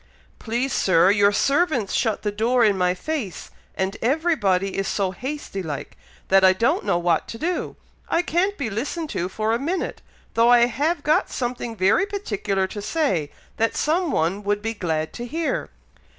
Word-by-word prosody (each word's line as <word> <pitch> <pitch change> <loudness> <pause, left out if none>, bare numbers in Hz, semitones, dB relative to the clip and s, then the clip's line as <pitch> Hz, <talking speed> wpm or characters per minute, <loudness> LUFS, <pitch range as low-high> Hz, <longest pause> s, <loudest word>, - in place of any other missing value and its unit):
"Please, 240 +4 -2
Sir, 185 0 +4
your 205 0 +4
servants 275 - +1
shut 220 -4 0
the 210 - 0
door 230 +3 +2
in 205 -2 +3
my 180 -1 +1
face, 255 - -5 0.2
and 190 +1 -2
every 320 +8 +2
body 195 -5 0
is 195 0 -1
so 195 -2 0
hasty 260 -1 -5
like, 150 -6 -6 0.3
that 195 0 +5
I 185 0 +7
don't 270 - +1
know - - +1
what 175 -2 +1
to 230 - -7
do. 350 +7 -2 0.3
I 335 - +2
can't 375 +4 0
be 250 -7 -3
listened 295 - -3
to 175 +2 -2
for 215 +3 -1
a 230 - 0
minute, 340 +7 -3 0.3
though 230 +1 +4
I 240 -1 +7
have 290 +7 -1
got 305 +1 +2
something 240 -2 -3
very 205 - +3
particular 210 - -2
to 205 +2 -6
say, 200 - 0 0.3
that 225 +1 +1
some 335 +3 +1
one 180 - 0
would 205 0 -1
be 225 0 -1
glad 160 -6 -2
to 240 - -6
hear." 330 - -2
225 Hz, 180 wpm, -23 LUFS, 195-295 Hz, 0.3 s, I